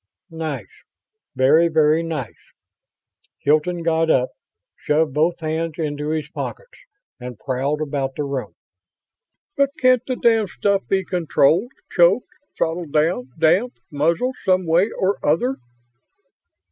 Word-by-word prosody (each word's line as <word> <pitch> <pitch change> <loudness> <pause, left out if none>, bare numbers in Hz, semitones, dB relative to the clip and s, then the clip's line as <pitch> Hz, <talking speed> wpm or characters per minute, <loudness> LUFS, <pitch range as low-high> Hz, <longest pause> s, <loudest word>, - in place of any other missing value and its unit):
"Nice. 160 -3 -5 0.6
Very, 150 +6 +4
very 155 0 +3
nice." 155 -8 -4 1.0
Hilton 155 +4 +1
got 165 0 +1
up, 130 -4 +3 0.5
shoved 150 -1 0
both 165 +4 +1
hands 160 0 -2
into 150 -2 -3
his 155 -1 -2
pockets, - - -7 0.4
and 125 -2 -8
prowled 135 +5 -2
about 135 -2 -3
the 150 - -2
room. 140 -2 -4 1.0
"But 280 -2 +3
can't 255 -2 +4
the 255 - -1
damned 225 -5 +2
stuff 200 +1 0
be 190 -1 0
controlled? 175 - +2 0.2
Choked 180 +7 +4 0.3
throttled 165 -1 -2
down 150 -4 +1
damped 185 +10 +2
muzzled, 165 - 0
some 185 -1 +2
way 170 +6 +3
or 195 +1 0
other?" 245 - +1
160 Hz, 120 wpm, -21 LUFS, 150-185 Hz, 1.0 s, Very